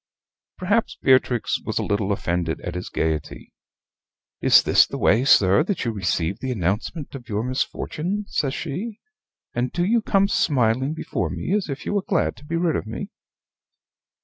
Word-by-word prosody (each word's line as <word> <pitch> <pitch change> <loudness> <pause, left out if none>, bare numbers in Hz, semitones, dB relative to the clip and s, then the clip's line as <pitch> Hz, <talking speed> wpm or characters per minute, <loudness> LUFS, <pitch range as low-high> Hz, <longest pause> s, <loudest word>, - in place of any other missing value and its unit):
Perhaps 205 +5 0
Beatrix 130 -3 +2
was - - -4
a - - +1
little 100 0 0
offended 85 -4 -1
at - - -5
his - - -5
gayety. 80 -2 -3 0.9
"Is - - +6
this - - +5
the - - -5
way, 115 +5 +3
sir, 100 -7 +5
that 190 -8 -2
you 115 - 0
receive 95 -2 -1
the 130 +2 -3
announcement 105 - -2
of 125 -3 -9
your 105 +1 -1
misfortune," 160 - -2
says 135 -3 -1
she, 200 +9 -5 0.5
"and 125 +1 -1
do 175 0 0
you 230 +4 +2
come 195 -2 +2
smiling 130 - +1
before - - -3
me 185 - -3
as 205 -6 -1
if 140 0 -5
you - - -2
were 200 - +1
glad 185 -2 0
to 145 - -15
be 165 - -3
rid 165 -2 +1
of - - -3
me?" 115 - -6
130 Hz, 175 wpm, -23 LUFS, -, 0.9 s, Is